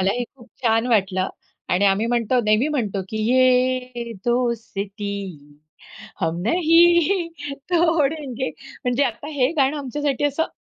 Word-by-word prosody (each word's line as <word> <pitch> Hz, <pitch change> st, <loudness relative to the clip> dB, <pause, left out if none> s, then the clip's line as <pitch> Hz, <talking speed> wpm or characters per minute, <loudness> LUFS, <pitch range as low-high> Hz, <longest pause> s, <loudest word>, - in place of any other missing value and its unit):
मलाही 200 Hz, +6 st, 0 dB
खूप 240 Hz, -1 st, -17 dB
छान 225 Hz, 0 st, +2 dB
वाटलं 190 Hz, -4 st, +1 dB, 0.4 s
आणि 185 Hz, +3 st, +2 dB
आम्ही 200 Hz, +4 st, +2 dB
म्हणतो, 240 Hz, +1 st, +1 dB
नेहमी 215 Hz, +7 st, +3 dB
म्हणतो, 210 Hz, -10 st, -2 dB
की 220 Hz, -, -5 dB, 0.2 s
"ये 255 Hz, -2 st, +2 dB
दोस्ती 200 Hz, -, -3 dB, 0.6 s
हम 165 Hz, +1 st, 0 dB
नहीं 345 Hz, -, +4 dB, 0.4 s
तोड़ेंगे." 300 Hz, -6 st, +1 dB
म्हणजे 270 Hz, 0 st, -3 dB
आता 260 Hz, +4 st, -4 dB
हे 265 Hz, -2 st, +2 dB
गाणं 275 Hz, +1 st, +2 dB
आमच्यासाठी 285 Hz, +1 st, -2 dB
असं 290 Hz, +3 st, +1 dB
250 Hz, 120 wpm, -22 LUFS, 210-285 Hz, 0.6 s, नहीं